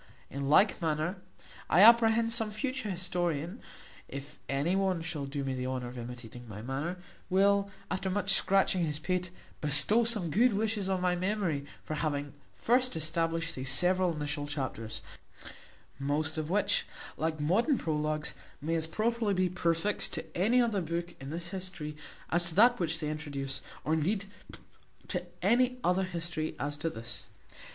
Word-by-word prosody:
In 140 0 -3
like 195 +6 +5
manner 160 +3 -1 0.5
I 175 - +5
apprehend, 230 0 +6
some 225 -2 +1
future 255 +1 -3
historian 175 - -1 0.5
(if 140 +1 -8
any 140 +7 +1
one 190 -3 +1
shall 155 -4 -2
do 140 0 -3
me 135 -1 -2
the 130 0 -3
honour 130 -1 -3
of 125 - -10
imitating 120 0 -8
my 105 +1 -8
manner) 140 +8 -3 0.3
will, 200 +1 +3 0.2
after 190 +1 -1
much 195 0 +3
scratching 190 -2 +4
his 150 -2 -1
pate, 180 +3 -2 0.3
bestow 150 +10 +5
some 210 -8 0
good 235 +7 +4
wishes 205 -1 0
on 190 -1 0
my 180 -1 +2
memory, 180 -6 -1 0.2
for - - -5
having 145 -2 -2 0.2
first 250 +2 +2
established 165 +1 0
these 130 -2 -2
several 180 +4 +3
initial 150 -1 -3
chapters; 130 -6 -4 1.0
most 150 +3 0
of 155 -1 -3
which, 205 +3 +2 0.3
like 160 0 -2
modern 215 - +2
prologues, 155 -2 -1 0.3
may 155 +4 -2
as 160 -1 +2
properly 220 +3 0
be 185 0 +2
prefixed 170 +2 0
to - - -4
any 220 +8 +3
other 225 -5 +2
book 170 +1 -3
in 135 - -6
this 170 +2 -4
history 180 -5 -5 0.4
as 175 +1 +3
to 160 - -8
that 245 +4 +6
which 165 -2 0
they 155 -2 -3
introduce, 140 -3 -4 0.2
or 155 - 0
indeed 195 +6 0 0.8
to - - -1 0.2
any 250 +1 +3
other 180 +2 +2
history 165 -3 -3
as 145 +1 -2
to 165 +3 -2
this. 115 -6 -5
170 Hz, 160 wpm, -30 LUFS, 150-195 Hz, 1.0 s, apprehend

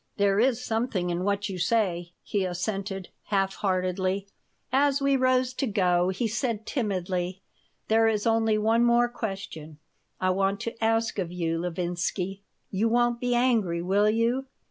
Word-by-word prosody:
"There 200 -1 +3
is 245 0 +3
something 220 -6 -1
in 175 +1 -2
what 200 +1 0
you 190 -3 -5
say," 175 -3 0
he 200 -2 -1
assented, 195 +1 -3 0.2
half 195 -2 +1
heartedly 185 0 -1 0.4
As 280 +1 +3
we 275 0 +2
rose 255 -1 +2
to 265 - -1
go 180 -4 +2
he 225 +5 -1
said, 225 -1 -2
timidly: 185 -5 -2 0.4
"There 225 +1 +4
is 215 -2 0
only 225 -1 +3
one 225 +2 +3
more 240 0 +4
question 195 -10 -6 0.4
I 185 0 +2
want 195 +1 +1
to 230 -1 -5
ask 225 -1 +1
of 175 -3 -2
you, 165 -2 -1
Levinsky. 180 +2 -2 0.3
You 210 +4 +1
won't 240 0 +2
be 245 0 0
angry, 220 -9 +2
will 200 +3 +3
you?" 235 +4 +1
205 Hz, 155 wpm, -27 LUFS, 185-230 Hz, 0.4 s, There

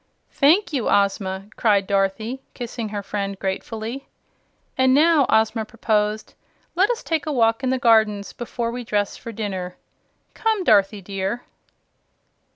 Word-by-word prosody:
"Thank 320 +6 +3
you, 255 -6 0
Ozma!" 195 -1 +1
cried 205 -3 +3
Dorothy, 200 +6 -1
kissing 235 -2 -5
her 205 -1 -4
friend 200 0 -3
gratefully. 220 +7 -4 0.7
"And 260 0 +4
now," 310 -2 +4
Ozma 220 +1 +2
proposed, 215 -1 -1 0.4
"let 380 +4 +3
us 485 0 -2
take 320 -2 -2
a - - 0
walk 230 -1 +2
in 260 - +1
the 260 - +1
gardens 220 -4 +3
before 235 -1 -4
we 245 +1 -5
dress 205 -3 -1
for 230 - -8
dinner. 190 -5 -5 0.6
Come, 440 -3 0
Dorothy 200 - +3
dear!" 195 +5 -3
220 Hz, 140 wpm, -22 LUFS, 200-260 Hz, 0.7 s, And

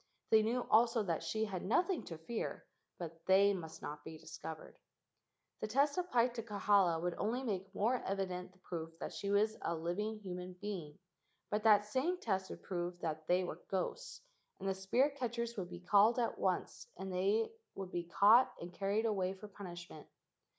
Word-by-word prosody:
They 220 -1 +7
knew 240 +3 0
also 230 0 +5
that 170 -5 -1
she 220 0 -1
had 190 -4 -4
nothing 350 - +2
to 165 - -6
fear, 220 +9 -4 0.3
but 165 -1 -7
they 200 +2 +6
must 160 -4 -7
not 150 0 -6
be 160 0 -8
discovered. 160 0 -8 0.8
The - - -2
test 280 +6 +3
applied 250 -10 +2
to 235 - -3
Kahala 200 -5 +3
would 175 +1 -1
only 240 +5 0
make 195 -5 -3
more 240 +4 +2
evident 185 -2 -2
the 185 - -25
proof 165 -3 -6
that - - -5
she 200 - -3
was 210 +2 +3
a 170 - -1
living 185 +7 -2
human 180 -3 -6
being, 180 -6 -6 0.5
but 210 +1 +1
that 210 -2 +7
same 275 +12 0
test 190 - -1
would - - -8
prove 175 -1 -3
that 155 -1 -3
they 180 +1 +3
were 180 - -5
ghosts, 195 - -3 0.4
and 195 - -4
the 195 - +2
spirit 245 +10 +1
catchers 235 -2 -2
would 180 -3 -4
be 175 -1 -7
called 205 +5 +5
at 240 -2 0
once - - -1
and 190 -1 -5
they 200 +5 +2 0.2
would 190 -2 -6
be 175 -1 -2
caught 210 +8 +6
and 175 +1 -7
carried 200 +4 0
away 190 -4 +1
for 205 +2 -10
punishment. 175 -5 -9
195 Hz, 185 wpm, -36 LUFS, 180-220 Hz, 0.8 s, They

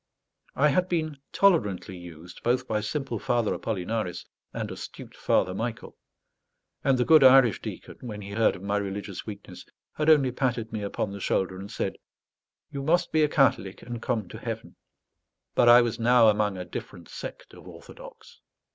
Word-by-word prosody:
I 150 +2 +4
had 180 +6 +1
been 155 -4 -1
tolerantly 105 - +2
used 85 0 -11
both 125 +1 0
by 105 -1 -1
simple 130 0 -3
Father 120 0 0
Apollinaris 105 -2 -3 0.3
and - - -4
astute - - -9
Father 90 - +1
Michael; 115 +3 -5 0.9
and 135 -1 +3
the 125 - +1
good 155 -3 +7
Irish 130 -5 +6
deacon, - - -8
when 105 -4 -7
he 100 - -8
heard 110 +2 +2
of 90 - -11
my 100 +1 0
religious 100 0 -5
weakness, 105 -2 -9 0.3
had 150 +1 0
only 140 -5 +5
patted 120 -3 -2
me 110 - -3
upon 100 0 -3
the 100 - -7
shoulder 95 0 0
and 100 +1 -8
said, - - -3 0.7
"You 140 -1 -4
must 165 +5 +1
be 155 - +3
a 150 - +3
Catholic 115 -10 +1
and 120 -1 -6
come 110 -6 -2
to - - -9
heaven." - - -6 0.8
But 120 - +4
I 120 +1 +8
was 120 0 -3
now 120 -1 +5
among 105 -2 +1
a 90 - -5
different - - -8
sect - - -9
of - - -14
orthodox. - - -13
115 Hz, 175 wpm, -26 LUFS, 100-135 Hz, 0.9 s, I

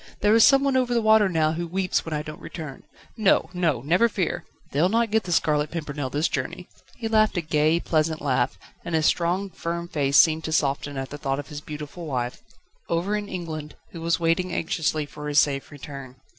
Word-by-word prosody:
There 210 +1 +4
is 225 0 +7
someone 275 -1 +5
over 250 -2 +2
the - - +4
water 215 -2 +5
now 160 -3 +2
who 170 +2 -3
weeps 185 +1 0
when 165 - -7
I 150 - -2
don't 155 0 -9
return 155 -6 -8 0.4
No! 195 -5 +3
no! 165 -9 0
never 180 - +3
fear 180 -4 -2 0.3
they'll 155 +6 +2
not 230 +1 +1
get 220 0 +2
The 175 - -4
Scarlet 150 -3 +2
Pimpernel 150 -4 -4
this 145 +5 +1
journey 180 - -4 0.2
..." - - -26
He 230 - -3
laughed, 215 -3 +3
a - - +2
gay, 155 +1 +2
pleasant 155 -1 0
laugh, 125 -8 0 0.3
and 170 - -2
his 155 -1 +2
strong, 180 +5 +1
firm 170 0 -4
face 145 -4 +1
seemed 160 -1 +5
to 160 - -3
soften 145 -2 0
at 135 0 -4
thought 140 -2 -3
of 145 - -7
the 145 -2 -7
beautiful 150 +3 -7
wife, 125 -3 -3 0.5
over 175 +5 0
in 205 -1 -4
England, 160 -4 -6 0.2
who 165 - -8
was 165 +1 +1
waiting 170 +2 +1
anxiously 155 -2 -1
for 150 +1 -8
his 145 0 +4
safe 140 -2 +1
return. 140 -2 -9
160 Hz, 210 wpm, -25 LUFS, 150-185 Hz, 0.5 s, is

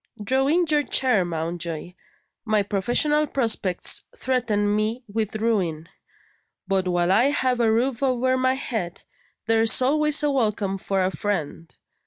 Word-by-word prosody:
Draw 265 +5 +1
in 345 +4 +2
your 300 -2 +2
chair, 250 -7 +2
Mountjoy. 170 0 -4 0.5
My 215 -3 +1
professional 245 +10 +1
prospects 225 -9 0
threaten 215 -5 0
me 220 +4 -2
with 215 0 -3
ruin 185 -8 -1 0.8
but 190 -1 0
while 175 0 +1
I 220 +6 +4
have 260 -3 0
a 230 -2 +3
roof 245 +2 0
over 255 -1 +1
my 260 0 +1
head, 215 -9 -5 0.4
there's 225 0 +4
always 300 +3 +2
a 295 - +2
welcome 210 -6 -1
for 190 0 -1
a 185 - -1
friend. 170 -5 -4
220 Hz, 140 wpm, -23 LUFS, 190-260 Hz, 0.8 s, I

